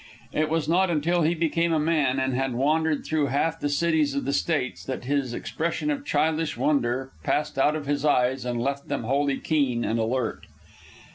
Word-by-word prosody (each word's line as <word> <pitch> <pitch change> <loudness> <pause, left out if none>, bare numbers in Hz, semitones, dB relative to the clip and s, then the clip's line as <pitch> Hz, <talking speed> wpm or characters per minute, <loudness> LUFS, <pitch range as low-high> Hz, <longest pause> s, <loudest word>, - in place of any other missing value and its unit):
It 155 0 +1
was 160 -1 0
not 180 +3 +3
until 170 +2 +1
he 165 +2 +2
became 165 +1 +1
a 160 - +2
man 150 -4 +1
and 130 0 0
had 130 -1 -1
wandered 155 +3 +1
through 155 -2 +1
half 160 +5 0
the 145 - -1
cities 155 -1 +1
of 140 - -2
the 140 - -1
States 140 -4 -1
that 130 -2 -4
this 135 -1 -1
expression 170 - -2
of 285 -1 -3
childish 160 - 0
wonder 135 -2 0
passed 150 -2 -1
out 150 +3 +3
of 155 -2 -4
his 145 0 -1
eyes 130 -3 +2
and 120 -1 -2
left 140 +3 -2
them - - -2
wholly 140 +3 +1
keen 135 -7 0
and 115 +1 0
alert. 120 +3 -2
145 Hz, 195 wpm, -25 LUFS, 130-160 Hz, -, not